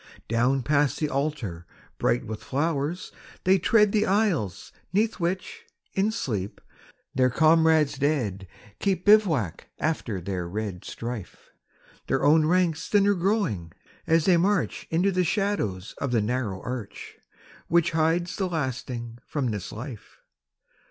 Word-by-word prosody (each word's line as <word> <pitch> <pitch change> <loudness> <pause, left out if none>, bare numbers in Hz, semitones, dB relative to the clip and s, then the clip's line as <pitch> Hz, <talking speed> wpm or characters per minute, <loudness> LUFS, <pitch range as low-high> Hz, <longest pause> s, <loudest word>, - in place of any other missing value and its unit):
Down 125 +3 +1
past 145 +1 +2
the 150 - 0
altar, 135 - -3 0.3
bright - - +1
with 110 0 -6
flowers, 150 +4 -2 0.3
they 190 +1 +4
tread 210 +3 +4
The 215 +1 +2
aisles 190 - 0 0.2
'neath 215 +3 +1
which 185 +2 -3 0.3
in 200 +3 +1
sleep 105 - -3 0.5
their 130 -1 +3
comrades 155 0 +4
dead 115 -10 0 0.3
Keep 190 -3 0
bivouac 165 - +3
after 130 -10 -2
their 90 -1 -4
red 100 -2 -4
strife, 115 -5 -7 0.6
Their 135 +1 +1
own 155 +1 +5
ranks 175 -2 +1
thinner 205 -1 +4
growing 175 - -1 0.3
as 165 -1 +3
they 180 -3 +5
march 195 +3 0
Into 180 +5 +2
the 185 -1 +1
shadows 170 - -1
of 140 - -1
the 120 - +3
narrow 110 -3 -2
arch 120 -5 -6 0.5
Which 170 0 +3
hides 165 +2 +1
the 190 -2 -1
lasting 125 -6 -4
from 135 -6 -1
this 105 -1 -5
life. 120 0 -9
145 Hz, 130 wpm, -26 LUFS, 110-180 Hz, 0.6 s, own